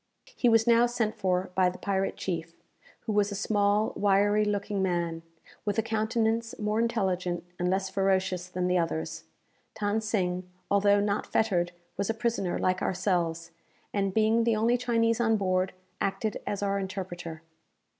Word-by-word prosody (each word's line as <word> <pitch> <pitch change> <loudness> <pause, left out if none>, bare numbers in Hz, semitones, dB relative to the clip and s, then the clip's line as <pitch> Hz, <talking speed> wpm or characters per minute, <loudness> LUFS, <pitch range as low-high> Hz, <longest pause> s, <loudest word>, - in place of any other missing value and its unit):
He 245 - +3
was 225 -1 +4
now 235 0 +5
sent 230 -3 -1
for 185 -3 0
by 185 -1 +3
the 180 - -8
pirate 195 -1 -1
chief, 165 -2 -4 0.5
who 225 - -4
was 205 0 +2
a - - -3
small 205 +1 +1
wiry 205 +1 +3
looking 205 -1 -1
man, 170 -3 -1 0.4
with 205 +1 -1
a 225 - +2
countenance 225 +1 0
more 210 +1 0
intelligent 185 -7 0 0.2
and 180 0 +1
less 190 +1 0
ferocious 190 -2 +1
than 180 0 -2
the 180 0 +2
others. 165 -1 -3 0.5
Than 210 +1 +1
Sing, 185 -4 -1 0.2
although 200 0 +4
not 200 0 0
fettered, 175 -6 +1 0.3
was 200 +2 -1
a 225 - 0
prisoner 225 -6 -1
like 185 0 0
ourselves, 175 -3 -1 0.4
and, 195 -1 0
being 220 +3 +3
the 230 -1 +2
only 230 +3 +3
Chinese 230 -2 +1
on 225 -1 +3
board, 185 -1 +1 0.3
acted 195 +2 -1
as 205 0 -2
our 200 0 0
interpreter. 175 -4 -6
200 Hz, 160 wpm, -28 LUFS, 185-220 Hz, 0.5 s, now